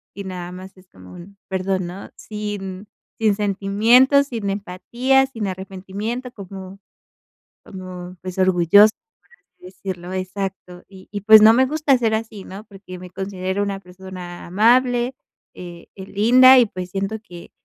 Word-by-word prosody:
y 200 - -6
nada 180 -1 -6
más 185 +1 -11
es 185 0 -20
como 90 -1 -15
un 200 +3 -13
"Perdón", 190 -1 -2
¿no?, 185 +3 -9
sin 205 -2 -7 0.3
sin 215 -2 +2
sentimientos, 220 +8 +3
sin 225 -6 -5
empatía, 235 +8 0
sin 225 -6 -5
arrepentimiento 195 +6 -6
como 195 -2 -10 0.9
como 185 -1 -9
pues 185 0 -7
orgullosa, 190 +3 +5 0.4
por - - -27
así - - -32
decirlo. 185 -1 -7
Exacto. 185 -1 -5
Y 190 -1 -15
y 205 -1 -5
pues 220 +1 +8
no 220 +1 +8
me 260 +2 +4
gusta 300 -2 +2
ser 225 -2 0
así, 220 -3 -6
¿no?, 195 +3 -9
porque 190 -2 -12
me 180 0 -10
considero 190 0 -4
una 200 -1 -3
persona 180 -1 -10
amable, 245 +5 +2 0.4
eh 175 -1 -11
eh, 190 -1 -9
linda 255 +5 +6
y 240 - +5
pues 185 -2 -7
siento 195 +2 -3
que 175 -5 -13
195 Hz, 155 wpm, -21 LUFS, 185-220 Hz, 0.9 s, pues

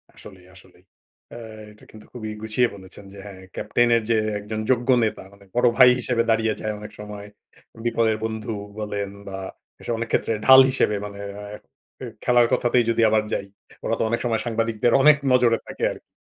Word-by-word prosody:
আসলেই, 95 -3 -13
আসলেই। 90 -1 -18 0.5
আ - - -8 0.3
এটা 105 - -20
কিন্তু 110 -1 -14
খুবই 110 -3 -6
গুছিয়ে 110 +3 +1
বলেছেন 95 +1 -13
যে, 100 - -13
হ্যাঁ 95 -2 -11
ক্যাপ্টেনের 120 -1 +2
যে 115 - +3 0.2
একজন 110 +1 -5
যোগ্য 125 0 +1
নেতা 110 - -2
মানে 100 0 -19
বড় 125 0 +4
ভাই 125 -1 +9
হিসেবে 120 -2 0
দাঁড়িয়ে 110 -1 +1
যায় 110 0 -2
অনেক 105 - -9
সময়। 105 -1 -8 0.6
বিপদের 115 -2 +1
বন্ধু 110 +1 -4 0.3
বলেন 105 -2 -3 0.2
বা, 95 0 -6 0.4
এসব 120 - -3
অনেক 115 0 -4
ক্ষেত্রে - - 0
ঢাল 130 0 +9
হিসেবে 115 -5 +1
মানে 100 -1 -9
অ্যা 105 0 -9 0.6
এ - - -4 0.2
খেলার 120 -1 +4
কথাতেই 120 -1 +2
যদি 115 - +1
আবার 110 0 +3
যাই, 100 - -2 0.4
ওরা - - 0
তো - - +1
অনেক 115 - 0
সময় 115 -2 0
সাংবাদিকদের 115 0 0
অনেক 150 +1 +7
নজরে 120 -2 +4
থাকে - - -7
আরকি। - - -13
110 Hz, 180 wpm, -23 LUFS, 105-120 Hz, 0.6 s, ভাই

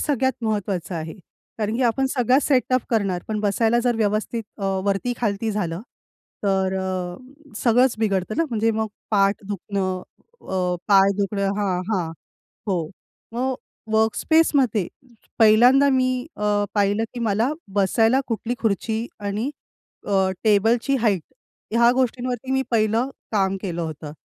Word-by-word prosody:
सगळ्यात 265 -2 +1
महत्वाचं 200 -4 -2
आहे. 160 -1 -5 0.4
कारण 215 +1 -1
की 255 - 0
आपण 255 +3 +2
सगळ्या 250 +1 +3
सेटअप 255 -2 +2
करणार, 195 -6 0
पण 215 -1 -2
बसायला 220 +3 +2
जर 240 -2 +2
व्यवस्थित 215 +2 -1 0.2
अ, 200 - -4 0.2
वरती 200 +5 0
खालती 220 -1 -1
झालं. 180 -5 -2 0.6
तर 190 -1 +1
अ, 190 +11 -6
सगळंच 245 +1 +3
बिघडतं 200 -1 0
ना, 330 - +2
म्हणजे 225 0 +1
मग 220 0 -1 0.2
पाठ 200 0 +2
दुखणं, 190 -2 -3 0.4
अ, 180 -1 -1
पाय 195 -1 +6
दुखणं, 200 -1 0
हां, 190 -3 0
हां. 175 -5 -1 0.6
हो. 175 -5 0 0.5
मग 260 +2 -1 0.4
वर्कस्पेसमध्ये 225 - +2 0.5
पहिल्यांदा 245 +6 +6
मी 255 -1 +2 0.3
अ, 210 - -5 0.3
पाहिलं, 205 +1 +2
की 245 - -6
मला 225 +3 +1 0.2
बसायला 225 +5 +3
कुठली 230 +1 -2
खुर्ची 220 +1 -1
आणि 205 +5 -2 0.6
अ, - - -3 0.3
टेबलची 225 +5 +3
हाईट 205 -6 +2 0.5
ह्या 235 +1 +5
गोष्टींवरती 255 0 -1
मी 265 0 +2
पहिलं 225 +3 +2 0.2
काम 195 -2 +1
केलं 175 -4 -3
होतं. 155 -2 -6
215 Hz, 135 wpm, -23 LUFS, 195-240 Hz, 0.6 s, पाय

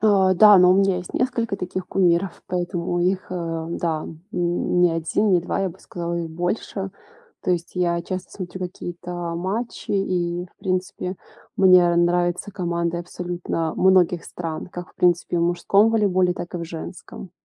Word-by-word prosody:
Э, 195 -3 +4
да, 210 +1 +8
но 180 0 +7
у - - +4
меня 195 -1 +3
есть 180 0 -7
несколько 235 -5 0
таких 185 0 -4
кумиров, 175 -1 +1
поэтому 175 -1 -2
их, 185 +2 0
э, 165 -2 -3
да, 165 -2 -2 0.3
не 175 0 +2
1, 165 +6 0
не 180 - +4
2, 175 - -2
я 190 - 0
бы 180 +2 -12
сказала, 170 -6 -5
их 165 -1 -4
больше. 185 +3 -3 0.5
То - - 0
есть 175 +1 -4
я 170 -1 +1
часто 185 +1 -5
смотрю 185 -1 -7
какие-то 175 -1 -6 0.2
матчи, 200 +7 -3
и, 180 -3 -1
в - - -31
принципе, 185 0 -2 0.4
мне 180 -2 +6
нравится 175 +2 +1
команды 170 -3 -2
абсолютно 175 -1 -3
многих 180 -2 +4
стран, 165 -3 -5
как, 175 0 -9
в - - -47
принципе, 175 0 +2
в - - +1
мужском 175 +5 +3
волейболе, 185 -5 +2
так 175 -1 -7
и - - -2
в 170 - -4
женском. 170 +2 -8
180 Hz, 165 wpm, -23 LUFS, 170-190 Hz, 0.5 s, да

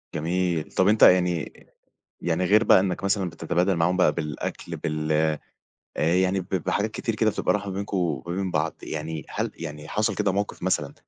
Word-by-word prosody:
جميل. 85 0 -1
طَب 95 - +2
أنت 110 +1 +4
يعني 90 -4 +4 0.7
يعني 85 +2 0
غير 105 +4 +5
بقى - - +6
إنّك 95 0 -2
مثلًا 95 -2 0
بتتبادل 85 +3 0
معاهم 90 +3 +1
بقى 90 - +4
بالأكل 75 -1 -5
بال 75 0 -2
آآ 75 0 +2 0.8
يعني 95 +1 +2
ب 90 - -7
بحاجات - - -1
كتير - - -3
كده - - +2
بتبقى - - 0
رايحة 100 -1 -2
ما - - -4
بينكم 100 0 -3
وبين 85 +3 -2
بعض، 80 +1 -1
يعني 80 -1 -5
هل - - -2
يعني 75 -2 -7
حصل 110 +1 0
كده 100 -2 +1
موقِف 100 -2 -3
مثلًا 75 -6 0
90 Hz, 180 wpm, -25 LUFS, 80-95 Hz, 0.8 s, بقى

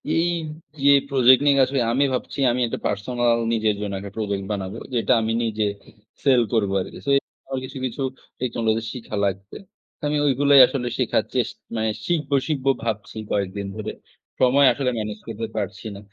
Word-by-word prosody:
এইযে 155 -4 0 0.2
প্রজেক্ট 130 -2 +6
নিয়ে 140 -1 +5
কাজ 130 - +5
করি 135 -2 +1
আমি 140 +3 +3
ভাবছি 130 - -4
আমি 125 +1 -1
একটা - - -4
পার্সোনাল 120 +3 0 0.2
নিজের 110 -2 +1
জন্য 100 -1 -3
একটা 100 0 -8
প্রজেক্ট 100 -3 -2
বানাবো। 100 +1 -4 0.2
যেটা 115 - +3
আমি 110 0 -1
নিজে 110 -2 0 0.6
সেল 130 -3 +5
করবো 100 -4 +1
আরকি। - - -8
সো - - +3
এ - - +3 0.3
আমার 135 -1 -3
কিছু, 130 - -9
কিছু, 130 +2 -4 0.4
টেকনোলজি 115 -2 0
শিখা 120 -4 -7
লাগবে। 100 0 -4 0.4
তো - - -29
আমি 150 - +1
ঐগুলোই 140 0 +5
আসলে 125 -4 -3
শিখার - - +1
চেষ - - +1 0.3
মানে 110 0 0 0.2
শিখবো 150 -5 0
শিখবো 135 -4 0
ভাবছি 110 -1 -4
কয়েকদিন 100 0 -2
ধরে। 110 0 -4 0.5
সময় 135 +3 +5
আসলে 125 +1 -1
ম্যানেজ 105 -1 -4
করতে 115 0 -4
পারছি 100 0 -4
না। - - -9
120 Hz, 175 wpm, -23 LUFS, 105-140 Hz, 0.6 s, প্রজেক্ট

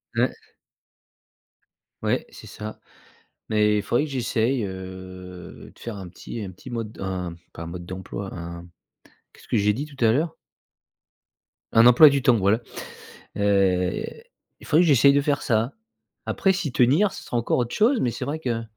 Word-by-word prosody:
Ouais. - - +1 1.7
Ouais, - - 0
c'est - - -12
ça 105 0 -8 0.7
mais 105 -1 +3
il 105 - 0
faudrait 120 +8 +1
que 150 - -7
j'essaye, 120 -1 0
heu, 95 -1 -9
de - - -23
faire 115 -3 -6
un 95 -2 -7
petit 105 +5 -8
un 95 - -5
petit 95 +7 -12
mode 115 -2 -5
un 90 -3 -3 0.2
pas 85 - -8
un - - -6
mode 85 +1 -7
d'emploi, 95 +2 -6
un 85 0 -7 0.7
qu'est-ce - - -18
que - - 0
j'ai 105 0 +3
dit 135 +7 -3
tout 140 -5 -3
à 110 - +6
l'heure? 160 +6 0 1.4
Un 115 +1 +7
emploi 140 +5 +9
du 140 -1 +1
temps 125 -3 +4
voilà, 100 +4 +2 0.8
heu, 95 -3 +2 0.6
il - - -13
faudrait 160 +4 +4
que - - +3
j'essaye 140 0 +6
de 145 - +4
faire 145 0 0
ça. 115 +1 +1 0.5
Après 195 - +2
s'y 160 -8 -3
tenir 145 +13 +4
ce - - -9
sera 120 - -3
encore 120 +2 +1
autre 120 -1 -1
chose 235 +4 +3
mais 120 - +1
c'est 125 - -5
vrai 145 +3 -3
que 120 -6 -2
115 Hz, 175 wpm, -24 LUFS, 95-135 Hz, 1.7 s, emploi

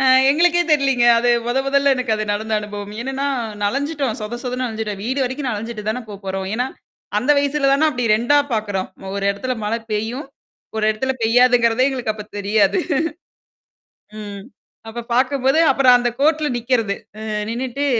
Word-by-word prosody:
அ - - +2 0.3
எங்களுக்கே 345 +3 +3
தெரியலீங்க. 275 -4 +3
அது 245 +1 +1 0.2
மொத 240 +2 0
மொதல்ல 280 0 +3
எனக்கு 245 -3 -1
அது 215 0 -2
நடந்த 220 +1 -3
அனுபவம். 205 0 -7
என்னன்னா, 270 +2 -2 0.4
நனஞ்சுட்டோம். 275 +1 -1
சொத 225 +3 -5
சொதன்னு 250 0 -3
நனஞ்சுட்டோம். 220 -3 -4
வீடு 260 +4 -1
வரைக்கும் 260 +1 -3
நனஞ்சுட்டு 220 0 -5
தானே 225 +3 -1
போ 210 - -7
போறோம். 190 0 -3
ஏன்னா, 250 +3 0 0.5
அந்த 250 +7 0
வயசுல 280 -1 +1
தானா 310 +3 +4
அப்டி 250 -4 -2
2ஆ 250 +6 +3 0.2
பார்க்குறோம். 205 -3 -2 0.3
1 200 - -2
இடத்துல 255 +6 -3
மழை 225 +3 -1
பெய்யும். 225 +6 -3 0.5
1 215 - 0
இடத்துல 260 +5 -1
பெய்யாதுங்கிறதே 245 +1 +4
எங்களுக்கு 250 -5 -2
அப்ப 210 -1 -8
தெரியாது. 205 - +2 1.4
ம். 200 -1 -7 0.5
அப்ப 235 +2 -5
பார்க்கும்போது 265 +3 +2
அப்புறம் 255 -2 +6
அந்த 245 0 0
கோட்ல 305 0 +2
நிக்கிறது. 230 -4 0 0.2
அ - - -7 0.3
நின்னுட்டு 255 +4 -2
245 Hz, 155 wpm, -20 LUFS, 215-270 Hz, 1.4 s, அப்புறம்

